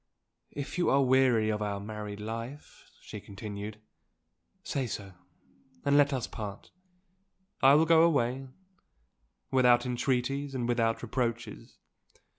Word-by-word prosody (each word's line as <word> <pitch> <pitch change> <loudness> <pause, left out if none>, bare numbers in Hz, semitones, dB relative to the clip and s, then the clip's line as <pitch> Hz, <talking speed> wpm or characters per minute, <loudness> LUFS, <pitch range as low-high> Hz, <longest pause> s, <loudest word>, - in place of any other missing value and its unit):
"If 145 +5 -6
you 175 - +2
are 140 0 +4
weary 125 -4 +3
of 105 0 -2
our 100 -1 -2
married 105 0 -6
life," 115 +7 -7
she - - -9
continued, 105 +1 -7 0.8
"say 135 -3 -2
so, 100 -3 -6 0.7
and 140 0 +3
let 145 0 +5
us 130 -4 -1
part. 105 -3 -8 0.9
I 135 +1 +7
will 155 +2 +5
go 165 0 +6
away, 135 -5 +2 1.0
without 125 -2 +4
entreaties 130 +2 -1
and 120 -2 -1
without 115 -1 0
reproaches. 120 -1 -3
120 Hz, 120 wpm, -29 LUFS, 110-135 Hz, 1.0 s, I